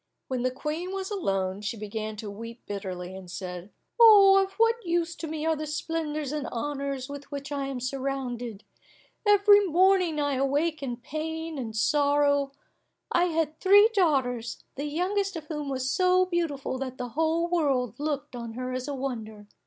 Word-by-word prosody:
When 255 -2 -1
the 255 - +2
Queen 305 +7 -4
was 390 +1 -4
alone, 195 - -1
she 210 +2 -3
began 215 +1 -4
to 210 -1 -6
weep 230 +3 -9
bitterly, 190 -2 -5
and 190 -2 -10
said, 180 0 -6 0.3
"Of 390 -3 +8
what 455 +3 +2
use 340 -1 0
to 325 - -5
me 310 0 -4
are 320 0 +2
the 305 0 -5
splendours 305 -2 -3
and 295 -3 -3
honours 275 +1 -3
with 285 0 -8
which 280 0 -6
I 280 -1 -2
am 270 -2 -4
surrounded; 250 -4 -4 0.6
every 410 0 +7
morning 365 -2 +3
I 285 -2 0
awake 290 +4 0
in 245 -3 -3
pain 320 +4 -5
and 225 -4 -5
sorrow. 285 +2 +2 0.6
I 345 - +3
had 320 -3 -1
three 410 +3 +6
daughters, 260 - +1
the 285 - -4
youngest 385 +6 -1
of 320 -2 -6
whom 300 -2 -4
was 260 -1 -1
so 370 0 +4
beautiful 325 -7 -2
that 260 -1 -5
the 245 -1 -4
whole 320 +5 +1
world 275 - +1
looked 290 -3 -3
on 235 -2 -6
her 255 +2 -4
as 255 +1 -3
a 285 - -3
wonder. 220 -6 -5
285 Hz, 170 wpm, -27 LUFS, 245-330 Hz, 0.6 s, Of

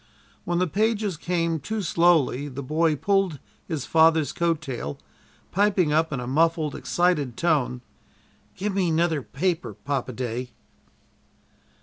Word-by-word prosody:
When 175 - 0
the 180 - +2
pages 210 +1 0
came 165 0 -1
too 215 +8 -3
slowly 165 -6 +3
the 140 0 -6
boy 155 +3 +1
pulled 195 -1 +1 0.3
his 155 -6 -3
father's 160 -2 +4
coat 170 -2 +1
tail, 120 - -5 0.5
piping 195 -6 +2
up 160 +1 +2
in 135 - -2
a 125 - -4
muffled, 160 +3 +1
excited 150 -9 0
tone: 145 -7 +1 0.7
"Give 205 +2 -2
me 185 -3 +1
'nother 165 -2 +1
paper, 165 +6 -2
Papa 135 -3 -3
day." 125 0 -4
160 Hz, 130 wpm, -25 LUFS, 140-175 Hz, 0.7 s, father's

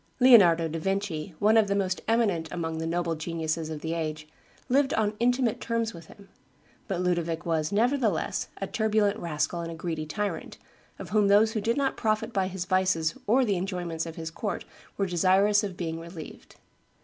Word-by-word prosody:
Leonardo 185 -10 +7
da 165 +1 -4
Vinci, 190 -2 -2
one 215 +2 +3
of 220 -2 +4
the 200 - 0
most 185 -2 -1
eminent 210 -8 +1
amongst 160 -2 -3
the 160 - -3
noble 170 0 -1
geniuses 160 0 -3
of 155 -2 -6
the 160 0 -3
age, 155 -2 -4 0.4
lived 275 +2 +2
on 215 -1 +1
intimate 245 -1 +1
terms 230 -1 -1
with 165 -2 -11
him; 200 -1 -16 0.6
but 190 -5 -2
Ludovic 170 -2 -1
was, 160 -2 0
nevertheless, 235 +3 +1
a - - -2
turbulent 215 -2 +1
rascal 170 +1 -2
and 165 0 -5
a - - -6
greedy 160 -1 -4
tyrant, 200 0 -4 0.4
of 185 -3 -9
whom 210 -1 +3
those 210 +2 +5
who 220 - -2
did 230 +5 0
not 275 -1 0
profit 220 +1 0
by 190 -2 +1
his 185 -1 -4
vices 185 -4 +1
or 250 +5 +4
the 200 -4 +1
enjoyments 175 -3 -3
of 165 - -7
his 165 0 -6
court 205 +5 -4 0.3
were 195 - +1
desirous 195 +4 +3
of 190 -3 -5
being 165 -2 -3
relieved. 165 -1 -10
185 Hz, 185 wpm, -27 LUFS, 165-215 Hz, 0.6 s, Leonardo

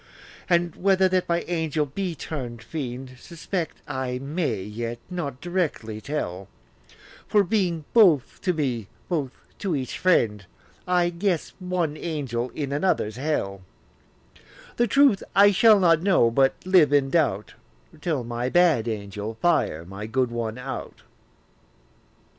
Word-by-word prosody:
And 175 -1 +2
whether 190 0 +3
that 185 -1 0
my 170 0 +2
angel 160 -3 -1
be 175 +5 -4
turn'd 125 -7 -6
fiend, 130 -1 -6
Suspect 170 +2 -5
I 130 -3 -3
may, 135 - -2
yet 115 +3 -5
not 145 -8 -4
directly 155 - -2
tell: 95 -11 -4 0.8
For 205 -1 +4
being 175 -5 0
both 180 - +4
to 185 - +1
me, 130 - -2 0.2
both 150 -7 -1 0.3
to 190 -6 -1
each 130 -2 -4
friend, 110 - +2 0.4
I 175 -1 +2
guess 175 -1 -1
one 180 -5 -2
angel 135 -8 -3
in 140 -2 -3
another's 140 - 0
hell: 125 -9 -2 1.2
The 240 - +3
truth 275 -3 +4
I 205 +1 +7
shall 215 +1 +6
not 165 -3 +4
know, 180 -11 +3
but 135 +2 +3
live 185 -6 +5
in 140 -2 +3
doubt, 105 - +1 0.5
Till 150 -7 -1
my 120 +1 -3
bad 165 -8 +3
angel 105 0 -4
fire 110 - +1
my 100 +4 -7
good 125 +1 0
one 115 -1 -3
out. 125 +2 -7
150 Hz, 135 wpm, -25 LUFS, 120-175 Hz, 1.2 s, I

